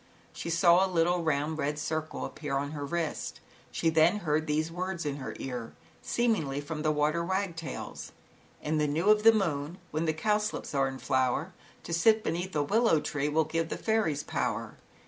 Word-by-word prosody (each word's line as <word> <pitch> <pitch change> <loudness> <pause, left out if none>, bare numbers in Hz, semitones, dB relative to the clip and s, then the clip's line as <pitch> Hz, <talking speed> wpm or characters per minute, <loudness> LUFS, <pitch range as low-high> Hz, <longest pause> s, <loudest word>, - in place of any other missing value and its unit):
She - - -5
saw 170 +2 +5
a 195 - +1
little 175 0 +2
round 155 0 0
red 150 0 0
eirc 155 +1 -3
appear 145 -3 -3
on 145 +1 -2
her 145 -2 -5
wrist. 160 +2 -3 0.3
She 165 - 0
t] 160 -1 +3
these 155 +1 -1
words 180 -1 -3
in 145 -1 -2
her 135 - -6
ear, 125 -3 -5 0.3
see: 240 - 0
the 150 -5 0
water 150 +3 +1
wagtails: 170 -5 -3
flower. - - -14 0.3
" - - -30
In 155 0 +1
the 150 - +2
new 165 +8 +3
of 215 0 +4
the 225 +1 +8
moon, 170 -6 -1
When 155 +2 -1
the 160 - +1
cowslips 210 +4 -1
are 135 -1 +2
hi 130 +1 0 0.4
To 170 - -5
sit 215 +6 +4
beneath 175 +3 -2
a 150 - +2
willow 215 +1 +3
tree.. 145 0 -2
Will 160 +2 +3
give 165 +1 -1
the - - -3
fairies 215 -10 0
power. - - -2
160 Hz, 185 wpm, -29 LUFS, 150-180 Hz, 0.4 s, the